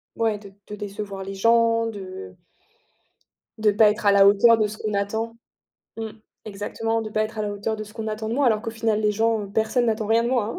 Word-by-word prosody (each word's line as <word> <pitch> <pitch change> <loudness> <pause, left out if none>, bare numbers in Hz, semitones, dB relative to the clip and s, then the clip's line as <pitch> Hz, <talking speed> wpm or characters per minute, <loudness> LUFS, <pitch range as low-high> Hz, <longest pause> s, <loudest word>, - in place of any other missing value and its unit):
Ouais, 225 -2 0
de 200 -2 -13 0.2
de 210 - -6
décevoir 200 -1 -6
les 195 0 -7
gens, 230 +2 +3
de 185 - -8 1.2
de 215 -1 +3
pas 210 +1 +5
être 210 0 -3
à 200 - +6
la 200 0 +6
hauteur 225 +3 +6
de 215 -1 +2
ce 215 +1 -8
qu'on 215 -1 -3
attend. 220 +3 -2 0.6
Mmh. 225 -1 -5 0.3
Exactement, 225 +2 -3
de 215 - -6
pas 215 0 +1
être 215 0 -5
à - - 0
la 205 - -2
hauteur 210 +2 -3
de 215 - -6
ce 210 - -14
qu'on 220 -1 -5
attend 215 0 -4
de 230 - -2
moi, 280 -1 +2
alors 220 -2 +2
qu'au 225 - -4
final, 220 -1 0
les 210 -1 +2
gens, 220 -1 0
personne 225 +3 +1
n'attend 220 -1 0
rien 225 +1 +3
de - - 0
moi, 235 -4 0
hein. - - -6
215 Hz, 240 wpm, -23 LUFS, 205-225 Hz, 1.2 s, à